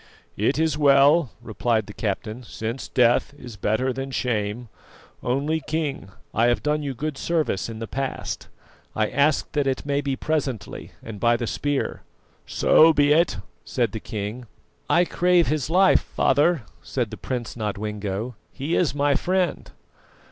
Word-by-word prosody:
"It 110 +8 +1
is 160 -1 +1
well," 140 +1 +5
replied 115 -1 0
the 105 - -10
captain, 110 +3 -3
"since 115 +1 -5
death 120 +3 +2
is 120 -5 -10
better 110 +7 0
than 135 +1 -4
shame. 120 -2 -2 0.5
Only 140 +6 0
King, 150 -11 -3 0.2
I 115 +2 +3
have 120 - +1
done 150 0 +1
you 140 -3 -4
good 150 +2 -4
service 155 - -1
in 115 - -6
the 115 - -4
past; 135 +3 -4 0.5
I 110 -1 0
ask 140 +2 +2
that 145 -2 0
it 130 0 -1
may 140 0 0
be 140 -1 -1
presently 135 - -3
and 110 -3 -8
by 120 +1 +3
the 120 - -3
spear." 145 +4 -2 0.5
"So 160 +1 +5
be 145 0 +4
it," 170 +3 +2 0.3
said 120 -6 -1
the 110 - -4
king. 110 +4 -5 0.4
"I 175 +1 +4
crave 175 -1 +3
his 150 -2 -1
life, 185 +3 +5
father," 150 -1 +2 0.2
said 120 -5 -3
the - - -5
Prince 125 -3 -4
Nodwengo; 105 +1 -3 0.2
"he 145 +5 -2
is 155 -6 +1
my 145 0 +2
friend." 185 +3 0
130 Hz, 155 wpm, -24 LUFS, 115-150 Hz, 0.5 s, well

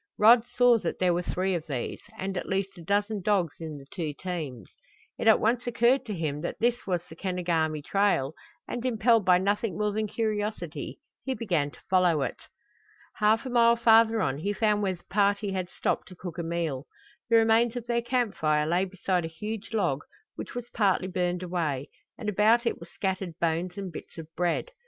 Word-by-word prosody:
Rod 225 +2 +7
saw 245 -2 +4
that 175 - -3
there 180 -1 +2
were 175 - 0
three 185 +2 -1
of 170 -2 -3
these, 130 -5 -4 0.2
and 190 0 -3
at - - -4
least 195 0 -1
a 175 - -11
dozen 205 +3 0
dogs 185 -6 +1
in 160 -3 -6
the 135 - -12
two 160 -5 -3
teams. 155 - -5 0.5
It - - -1
at 220 - +7
once 240 +3 +1
occurred 240 +2 +2
to 210 - -3
him 150 -3 -2
that 170 - -4
this 240 +1 0
was 175 -3 0
the 160 - -11
Kenogami 165 -4 -1
trail, 195 -7 +1 0.3
and 240 - -4
impelled 230 -2 +3
by 180 -1 +6
nothing 200 +1 0
more 210 0 +1
than 215 +1 -1
curiosity 215 -1 -3 0.3
he 265 -1 -2
began 175 -11 0
to - - -17
follow 180 -6 +3
it. - - -4 0.8
Half 215 +3 +3
a 255 - -4
mile 235 -1 +5
farther 225 -1 +5
on 135 +2 -1
he 200 +6 -1
found 210 0 +2
where 190 -2 0
the 175 - -21
party 200 0 +1
had 185 -2 -3
stopped - - -2
to 185 - -12
cook 175 -1 -7
a - - -1
meal. 165 -5 -2 0.4
The 230 - +4
remains 225 +1 +4
of 245 -2 -4
their 235 0 0
camp 240 -2 0
fire 150 -1 +1
lay 175 +4 +2
beside 185 -1 -1
a - - -2
huge 210 +6 -6
log, 175 -11 0 0.3
which - - -8
was 245 -1 -6
partly 195 -4 +1
burned 180 -1 -1
away, 160 -6 -2 0.3
and 220 - -6
about 215 +4 +4
it - - 0
were - - -10
scattered 190 -4 -3
bones 170 +2 -1
and 195 -2 -5
bits 165 - -10
of 165 - -6
bread. 175 - 0
190 Hz, 205 wpm, -28 LUFS, 170-225 Hz, 0.8 s, Rod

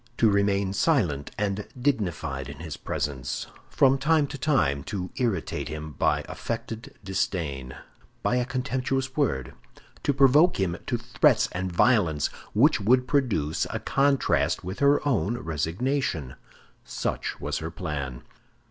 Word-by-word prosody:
To 110 -3 +4
remain 100 -1 +2
silent 95 - +1
and 105 0 -2
dignified 85 - -1
in 70 - -8
his 80 0 -6
presence; 65 -4 -3 0.2
from 135 0 +4
time 155 +1 +3
to 145 - -6
time 70 - +2
to 90 -3 -4
irritate 115 -10 -1
him 75 0 -6
by - - +1
affected 115 0 -5
disdain, 75 -9 -2 0.5
by 125 - +2
a 125 - +1
contemptuous 130 0 -2
word; 65 - 0 0.5
to - - +2
provoke 140 - +5
him 90 -3 0
to - - 0
threats - - +3
and 95 +1 -3
violence 85 - +3 0.2
which 125 +1 +4
would 125 +5 +3
produce 115 - +1
a - - -3
contrast 140 0 +2
with 95 +2 -5
her 140 +1 +3
own 120 -3 +1
resignation—such 80 - -3
was - - -2
her 80 - -4
plan. 70 -7 -5
100 Hz, 130 wpm, -26 LUFS, -, 0.5 s, provoke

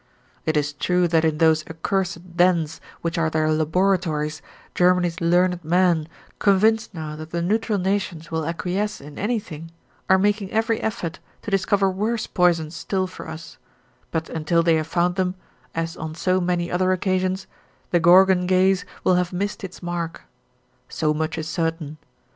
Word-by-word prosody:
It 155 -1 +2
is 145 0 0
true 180 +4 +1
that 160 -1 +3
in 160 -2 +1
those 160 -1 +4
accursed 175 +1 -3
dens 170 -3 +2 0.2
which 170 0 -2
are 160 -1 +2
their 155 0 +1
laboratories, 160 -1 0 0.3
Germany's 180 0 +2
learned 175 +1 +2
men, 170 -1 +2 0.3
convinced 215 +2 +3
now 155 -2 -5
that 155 +1 -8
the 170 +1 -2
neutral 215 +3 +1
nations 185 -4 -2
will 160 -1 -1
acquiesce 180 +6 -2
in 145 +1 -11
anything, 200 -8 -3 0.4
are 190 - +6
making 205 0 +1
every 225 0 +1
effort 185 -5 -3 0.2
to 215 - -5
discover 195 0 +2
worse 215 +4 -1
poisons 170 -3 +1
still 185 +3 -1
for 185 - -9
us, 160 +1 -9 0.5
but 160 0 -2
until 165 +1 +1
they 165 0 +4
have 160 -1 0
found 175 +2 0
them, 185 -1 0 0.4
as 165 +1 -2
on 155 -1 -6
so 185 +2 +1
many 175 -1 -1
other 185 +1 +2
occasions, 185 +1 0 0.5
the 175 - +4
Gorgon 180 +2 +5
gaze 185 0 +3 0.2
will 185 - +4
have 180 - -4
missed 200 +3 -3
its 185 -1 -8
mark. 170 -1 -4 0.7
So 155 -1 0
much 155 +1 -2
is 160 -1 -4
certain. 160 -1 -3
175 Hz, 160 wpm, -23 LUFS, 160-190 Hz, 0.7 s, are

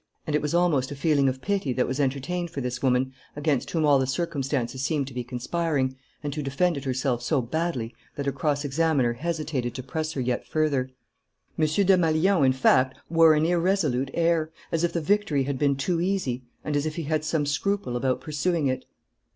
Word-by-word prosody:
And 150 - -1
it 150 - +2
was 150 +3 -1
almost 160 -7 +2
a 145 - -6
feeling 140 -2 +2
of 130 0 -5
pity 195 -10 0
that 125 0 +1
was 130 +3 -3
entertained 145 +6 -1
for 150 - -5
this 125 -1 -3
woman 130 0 +1 0.2
against 145 -3 0
whom 160 -2 +1
all 145 -2 +5
the 130 - 0
circumstances 135 -5 -2
seemed 145 -1 0
to - - -12
be 125 0 -3
conspiring, 130 +2 -1 0.3
and 145 -1 -3
who 150 - -3
defended 140 +1 0
herself 130 -2 0
so 140 +4 +1
badly 130 -2 -2 0.2
that 140 - -4
her 140 - +1
cross 145 +1 -1
examiner 145 -4 +2
hesitated 150 -3 -3
to 130 - -5
press 155 +4 -3
her - - -4
yet 125 -1 -1
further. 145 -5 0 0.7
M. 155 - +2
Desmalions, 175 -1 +3
in 130 - +4
fact, 130 0 +3
wore 165 -1 +6
an 155 +1 +2
irresolute 170 -7 +1
air, 165 -2 +2 0.2
as 165 0 0
if 170 - +2
the 170 - -1
victory 155 -5 +1
had 135 -1 -3
been 140 -2 +3
too 165 +5 -1
easy, 170 -10 -1 0.2
and 150 - -1
as 145 +2 +1
if 155 - -4
he 165 - -3
had 155 +1 -1
some 155 -1 0
scruple 150 -1 -1
about 130 +1 0
pursuing 155 +1 0
it. 130 -1 -1
145 Hz, 200 wpm, -26 LUFS, 130-165 Hz, 0.7 s, wore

